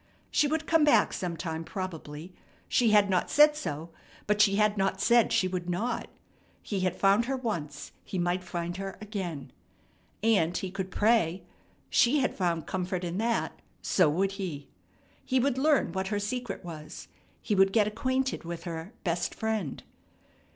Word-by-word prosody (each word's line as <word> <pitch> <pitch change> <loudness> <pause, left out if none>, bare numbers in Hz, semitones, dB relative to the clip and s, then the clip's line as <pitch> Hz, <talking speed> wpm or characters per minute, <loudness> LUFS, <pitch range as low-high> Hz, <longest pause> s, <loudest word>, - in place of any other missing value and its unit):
She 300 - +3
would 315 +2 -1
come 325 -1 +3
back 260 -8 +4
sometime 165 -2 -4
probably. 170 -3 -6 0.3
She 240 -2 +3
had 210 -1 +5
not 185 -2 +1
said 300 0 +6
so, 165 - -5 0.3
but 210 0 +2
she 200 -2 +5
had 210 0 +3
not 195 -1 0
said 235 +3 +4
she 185 - +3
would 180 -1 -4
not. 225 +7 -2 0.6
He 200 - -2
had 185 -1 0
found 200 +4 +3
her 270 +1 -1
once; 165 - -4
he 190 - -5
might 175 +1 0
find 175 0 -4
her 195 -1 -5
again. 190 -9 -5 0.7
And 185 -7 +3
he 190 - -4
could 190 -1 -4
pray. 205 -4 +2 0.5
She 245 +5 +4
had 260 - +1
found 170 -4 -1
comfort 185 -1 -3
in 175 +2 -3
that; 230 +1 -1 0.2
so 180 -5 +3
would 190 +6 +1
he. 150 -7 -5 0.6
He 260 -1 +1
would 260 0 +1
learn 290 - +3
what 190 +2 -2
her 205 +1 -1
secret 220 -2 -4
was. 155 -1 -8 0.3
He 215 - -2
would 195 -1 +4
get 215 0 +4
acquainted 260 +5 -1
with 170 0 -6
her 170 +3 -6
"best 170 -1 -1
Friend." 220 -10 -2
195 Hz, 165 wpm, -29 LUFS, 175-225 Hz, 0.7 s, said